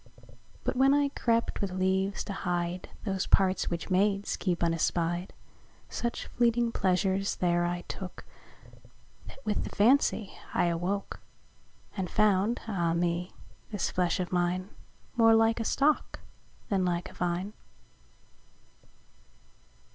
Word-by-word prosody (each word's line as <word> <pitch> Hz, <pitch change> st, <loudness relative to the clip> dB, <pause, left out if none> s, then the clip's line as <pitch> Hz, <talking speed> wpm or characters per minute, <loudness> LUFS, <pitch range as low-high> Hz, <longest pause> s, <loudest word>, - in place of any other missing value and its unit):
But -, -, -1 dB
when 270 Hz, +2 st, +5 dB
I 290 Hz, -1 st, +2 dB
crept 230 Hz, -4 st, 0 dB
with 200 Hz, -, -1 dB
leaves 190 Hz, +1 st, 0 dB
to 200 Hz, -, -5 dB
hide 175 Hz, -1 st, -2 dB, 0.2 s
Those 195 Hz, -2 st, -1 dB
parts, 190 Hz, -1 st, +3 dB
which 170 Hz, +2 st, -4 dB
maids 200 Hz, +2 st, +2 dB
keep 180 Hz, -3 st, -1 dB
unespy'd, 170 Hz, +1 st, 0 dB, 0.6 s
Such 235 Hz, 0 st, -3 dB
fleeting 235 Hz, -1 st, +1 dB
pleasures 190 Hz, 0 st, +1 dB
there 175 Hz, -1 st, +1 dB
I 175 Hz, 0 st, -2 dB
took, 185 Hz, +1 st, -8 dB, 1.0 s
That 270 Hz, -, -13 dB
with 210 Hz, -1 st, 0 dB
the -, -, -5 dB
fancie 220 Hz, -2 st, +3 dB, 0.2 s
I 175 Hz, -, +3 dB
awook; 180 Hz, +4 st, -2 dB, 0.8 s
And 185 Hz, -3 st, -3 dB
found 210 Hz, +2 st, +2 dB
(Ah 170 Hz, -6 st, 0 dB
me!) 175 Hz, +1 st, -1 dB, 0.3 s
this 205 Hz, -4 st, -2 dB
flesh 180 Hz, 0 st, 0 dB
of 180 Hz, -, -3 dB
mine 180 Hz, +1 st, 0 dB, 0.5 s
More 225 Hz, -1 st, +6 dB
like 225 Hz, +1 st, +3 dB
a -, -, 0 dB
Stock 285 Hz, +6 st, +1 dB, 0.5 s
then 195 Hz, -2 st, +1 dB
like 175 Hz, -1 st, -1 dB
a -, -, -16 dB
Vine. 180 Hz, +3 st, -2 dB
190 Hz, 125 wpm, -29 LUFS, 175-215 Hz, 1.0 s, More